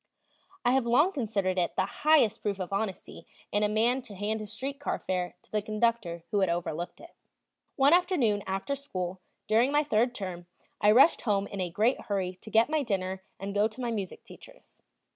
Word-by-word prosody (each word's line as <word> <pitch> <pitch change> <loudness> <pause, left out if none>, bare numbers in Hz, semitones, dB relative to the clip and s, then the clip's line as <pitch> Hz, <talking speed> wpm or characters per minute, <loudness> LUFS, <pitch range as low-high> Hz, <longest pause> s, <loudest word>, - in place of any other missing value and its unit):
I 245 - +5
have 260 -2 +2
long 295 +10 +4
considered 205 - -1
it 175 - -1
the - - +2
highest 300 -8 +3
proof 200 -2 -2
of 185 +1 -4
honesty 195 -1 -4 0.2
in 205 - +1
a 210 - +2
man 235 +5 +2
to 230 -5 -11
hand 210 +3 -2
his 215 -2 -7
street 275 +2 -5
car 290 - -2
fare 180 -1 -3
to - - -19
the 215 - 0
conductor 215 -5 -1
who 205 - +2
had 190 -2 +2
overlooked 170 0 -3
it. - - -13 0.6
One 280 +3 +5
afternoon 335 - +3
after 195 +8 -2
school, 190 -10 -5 0.3
during 225 +5 +3
my 295 +1 +3
third 245 -2 +1
term, 180 -4 -6 0.3
I 210 - +5
rushed 260 +9 +6
home 200 -3 +1
in 200 -1 -5
a 180 - -1
great 220 +9 +1
hurry 185 -3 -2
to - - -10
get 225 +2 +4
my 310 0 0
dinner 190 -6 -2 0.2
and 195 +1 -5
go 205 +1 +3
to 220 +2 -14
my 240 -2 -2
music 200 -5 -4
teacher's. - - -16
215 Hz, 200 wpm, -29 LUFS, 190-250 Hz, 0.6 s, rushed